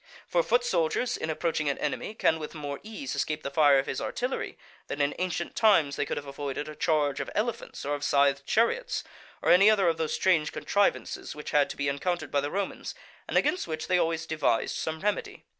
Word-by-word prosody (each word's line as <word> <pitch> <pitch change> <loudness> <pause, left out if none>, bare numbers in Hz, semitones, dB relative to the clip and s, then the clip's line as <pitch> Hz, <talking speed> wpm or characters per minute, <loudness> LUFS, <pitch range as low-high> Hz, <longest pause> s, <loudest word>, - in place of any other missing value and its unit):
For - - +2
foot 485 -1 +2
soldiers, 475 - +1
in 160 - -4
approaching 160 -2 0
an 140 - -1
enemy, 150 +8 -3
can 160 -6 +2
with 155 +1 -7
more 145 -2 -5
ease 225 +6 -6
escape 155 0 -2
the 140 - -4
fire 145 -1 +5
of 135 - +1
his 130 - -3
artillery 250 +2 -3 0.3
than 145 - -5
in 145 0 +2
ancient 175 -2 -2
times 170 -11 +4
they - - -1
could - - -2
have 145 - -5
avoided 140 +1 -4
a 155 - -6
charge 150 -4 +1
of - - -3
elephants 230 - -3
or 145 - -1
of 145 0 -3
scythed 140 -1 +3
chariots, 475 - +1 0.4
or - - +4
any 195 +4 +7
other 200 -4 +4
of 165 -1 +2
those 160 -1 -1
strange 165 -5 +2
contrivances 200 0 0
which 150 - -7
had 145 -1 +3
to - - -7
be 140 - -1
encountered 155 +5 -2
by 140 - +2
the 145 - -2
Romans, 195 +4 -4 0.3
and - - 0
against 365 - +1
which 155 -1 -4
they 180 -1 +2
always 165 -1 0
devised 155 -8 0
some 160 0 -3
remedy. 205 0 -2
160 Hz, 215 wpm, -28 LUFS, 145-200 Hz, 0.4 s, any